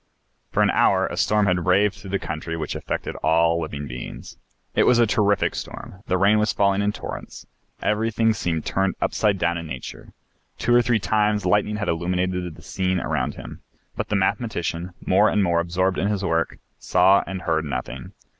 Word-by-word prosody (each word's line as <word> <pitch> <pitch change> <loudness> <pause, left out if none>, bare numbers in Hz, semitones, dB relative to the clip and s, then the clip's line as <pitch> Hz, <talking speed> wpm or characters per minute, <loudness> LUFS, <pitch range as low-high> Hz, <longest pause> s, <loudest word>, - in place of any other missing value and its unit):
For - - +3
an - - +3
hour - - +3
a - - -4
storm 105 -1 +2
had 90 -2 0
raved 100 +2 +4
through 100 0 -11
the 100 - 0
country 80 -1 -5
which 80 - -3
affected - - -4
all 85 +1 +2
living 75 -2 -5
beings. 60 -1 -8 0.4
It - - +3
was 125 - +5
a 120 - +5
terrific 100 -2 +2
storm, 95 - -8
the 95 - +1
rain 100 +3 +4
was 105 0 +2
falling 100 0 +2
in 100 0 +1
torrents, - - -8 0.4
everything 110 +1 +1
seemed 85 -6 -2
turned 95 0 0
upside 105 -2 +1
down 85 -1 0
in 85 - -7
nature. 65 -4 -8 0.5
Two 120 - +1
or 120 - +6
three 120 -1 +2
times 105 +1 +1
lightning 105 +3 +2
had 105 -1 -3
illuminated 90 0 -1
the - - -15
scene 95 -1 -1
around - - -2
him. - - -10 0.3
But - - -4
the 105 - 0
mathematician, 95 -4 -1
more - - +4
and 105 - +2
more 85 -2 +2
absorbed 90 +2 0
in 100 - +1
his 100 -2 -1
work, 80 -2 0 0.2
saw 100 +1 +4
and 95 -1 -5
heard 80 -2 0
nothing. 65 -2 -5
95 Hz, 190 wpm, -23 LUFS, 85-105 Hz, 0.5 s, or